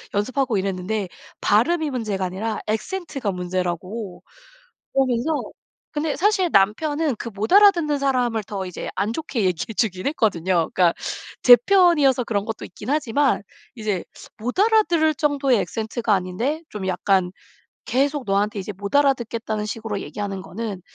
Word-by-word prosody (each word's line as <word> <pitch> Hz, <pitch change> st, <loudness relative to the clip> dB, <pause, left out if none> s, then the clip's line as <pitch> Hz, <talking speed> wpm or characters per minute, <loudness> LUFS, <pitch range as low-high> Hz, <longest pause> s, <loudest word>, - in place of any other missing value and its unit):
연습하고 240 Hz, +2 st, 0 dB
이랬는데 195 Hz, +1 st, -2 dB, 0.3 s
발음이 300 Hz, +9 st, +2 dB
문제가 210 Hz, -7 st, -2 dB
아니라 200 Hz, +5 st, -3 dB
악센트가 265 Hz, -, -3 dB
문제라고 180 Hz, +2 st, -4 dB, 1.0 s
그러면서 320 Hz, -, -2 dB, 0.6 s
근데 300 Hz, 0 st, -1 dB
사실 380 Hz, 0 st, +2 dB
남편은 290 Hz, +9 st, +2 dB
그 230 Hz, -, -5 dB
못 210 Hz, -, -3 dB
알아듣는 350 Hz, -8 st, +5 dB
사람을 250 Hz, -5 st, +1 dB
더 195 Hz, -1 st, -5 dB
이제 180 Hz, -, -6 dB
안 210 Hz, +3 st, 0 dB
좋게 250 Hz, -6 st, -2 dB
얘기해 185 Hz, +5 st, -1 dB
주긴 190 Hz, -1 st, 0 dB
했거든요. 185 Hz, -, +1 dB
그러니까 175 Hz, -2 st, +4 dB, 0.5 s
제 245 Hz, -, +11 dB
편이어서 290 Hz, -, +4 dB
그런 200 Hz, -3 st, -1 dB
것도 225 Hz, -, -5 dB
있긴 210 Hz, +6 st, -8 dB
하지만 285 Hz, -3 st, +1 dB, 0.3 s
이제 210 Hz, -5 st, -2 dB, 0.3 s
못 245 Hz, +8 st, -4 dB
알아들을 385 Hz, -7 st, +3 dB
정도의 275 Hz, -5 st, +2 dB
악센트가 225 Hz, 0 st, -2 dB
아닌데 210 Hz, -, -2 dB
좀 200 Hz, -3 st, -6 dB
약간 185 Hz, 0 st, +1 dB, 0.5 s
계속 275 Hz, +1 st, 0 dB
너한테 205 Hz, +1 st, 0 dB
이제 200 Hz, +2 st, -5 dB
못 200 Hz, +6 st, -2 dB
알아듣겠다는 230 Hz, -6 st, 0 dB
식으로 215 Hz, -1 st, -4 dB
얘기 -, -, -9 dB
하는거는 200 Hz, +1 st, -5 dB
225 Hz, 345 characters per minute, -22 LUFS, 195-285 Hz, 1.0 s, 제